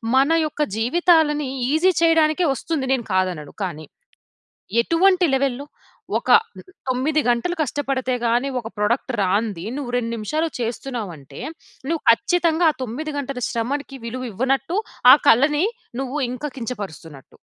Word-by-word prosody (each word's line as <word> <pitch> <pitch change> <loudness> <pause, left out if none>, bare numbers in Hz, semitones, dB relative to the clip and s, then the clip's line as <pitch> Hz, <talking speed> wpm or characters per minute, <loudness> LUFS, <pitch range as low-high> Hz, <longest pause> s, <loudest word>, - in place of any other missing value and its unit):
మన 270 +2 +5 0.2
యొక్క 305 - -7 0.2
జీవితాలని 300 +1 +3 0.2
ఈజీ 355 +4 +3
చేయడానికే 325 +1 +3
వస్తుంది. 310 -3 -3
నేను 245 -3 -1
కాదనను. 180 -6 -1
కానీ, 155 -3 -6 1.0
ఎటువంటి 360 +6 +3
లెవెల్‌లో? 275 0 -1 0.5
ఒక - - -6 0.6
9 265 +5 +1
గంటలు 245 +9 +1
కష్టపడితే 270 -3 -1
గాని 240 +4 +1
ఒక 225 - -7
ప్రొడక్ట్ 235 +5 0
రానిది, 195 -1 0
నువ్వు 275 -4 -4
2 230 -2 -1
నిమిషాలు 305 +10 -2
చేస్తున్నావంటే, 225 - -5 0.5
నువ్వు 330 -1 -1
ఖచ్చితంగా 330 +7 +2
ఆ - - -17
9 290 +6 -5
గంటల 275 -2 -4
శ్రమకి 275 +4 -3
విలువివ్వనట్టు. 255 - -2 0.3
ఆ - - +12
కళని 295 - +4 0.4
నువ్వు 270 +2 -4
ఇంకా 290 +4 -4
కించపరుస్తున్నట్టు. 195 - -8
265 Hz, 120 wpm, -22 LUFS, 230-305 Hz, 1.0 s, ఆ